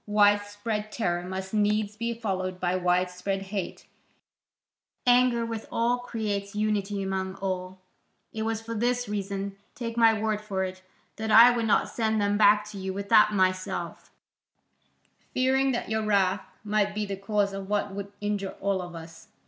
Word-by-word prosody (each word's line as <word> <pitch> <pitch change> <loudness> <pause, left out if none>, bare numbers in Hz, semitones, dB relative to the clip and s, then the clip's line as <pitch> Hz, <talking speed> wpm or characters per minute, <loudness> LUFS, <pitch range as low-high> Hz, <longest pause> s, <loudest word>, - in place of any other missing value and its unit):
Widespread 205 +1 +1
terror 175 -7 -1
must 190 +2 -6
needs 210 0 +1
be 230 +2 -2
followed 185 -5 -3
by 180 0 0
widespread 180 +2 0
hate: 195 0 -5 1.2
anger 245 -1 +4
with 225 -1 -5
all 240 +2 +1
creates 210 -4 -3
unity 205 -1 -1
among 190 0 -2
all. 185 -1 -4 0.6
It 220 - -4
was 225 0 -2
for 230 0 -5
this 245 +2 0
reason, 200 -1 -4 0.2
take 230 -1 -5
my 225 -2 +5
word 215 -1 -1
for 195 -3 -2
it, 185 0 -5 0.4
that 220 0 -3
I 230 +3 +9
would 230 -1 0
not 210 - +3
send 220 -2 0
them 205 0 +1
back 210 0 +5
to 200 - -8
you 190 0 -3
without 210 +2 +4
myself, 185 -1 -1 1.3
fearing 265 +1 +3
that 240 - -3
your 220 0 +1
wrath 200 -2 +2 0.2
might 210 -1 0
be 210 0 -1
the 200 -1 -4
cause 200 0 0
of 195 0 -6
what 205 -1 0
would 200 0 -6
injure 205 -2 -2
all 195 -1 0
of 175 -1 -8
us. 165 0 -11
205 Hz, 160 wpm, -27 LUFS, 190-220 Hz, 1.3 s, I